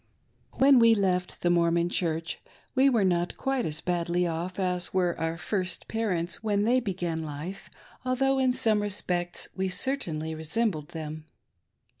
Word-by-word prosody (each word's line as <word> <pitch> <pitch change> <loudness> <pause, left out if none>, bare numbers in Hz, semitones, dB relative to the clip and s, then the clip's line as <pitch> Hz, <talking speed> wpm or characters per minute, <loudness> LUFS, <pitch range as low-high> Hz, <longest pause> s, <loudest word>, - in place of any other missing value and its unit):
WHEN 270 -1 +6
we 230 -1 +6
left 180 -3 -1
the 175 - +3
Mormon 170 0 +3
Church, 165 -2 -2 0.3
we 270 +1 +5
were 230 -6 +2
not 175 -2 0
quite 270 -2 -1
as 155 0 -1
badly 175 0 0
off 170 +2 -3
as 180 -1 0
were 180 -2 +2
our 165 +1 -1
first 185 +1 -3
parents 185 -7 -1
when 205 -2 +1
they 245 +4 +3
began 175 -7 -3
life, 155 +6 -7 0.3
although 265 +1 +1
in 260 -1 +3
some 225 -5 +2
respects 180 -4 -1
we 190 0 -1
certainly 170 - -1
resembled 160 0 -1
them. 155 -1 -7
180 Hz, 150 wpm, -28 LUFS, 170-225 Hz, 0.3 s, WHEN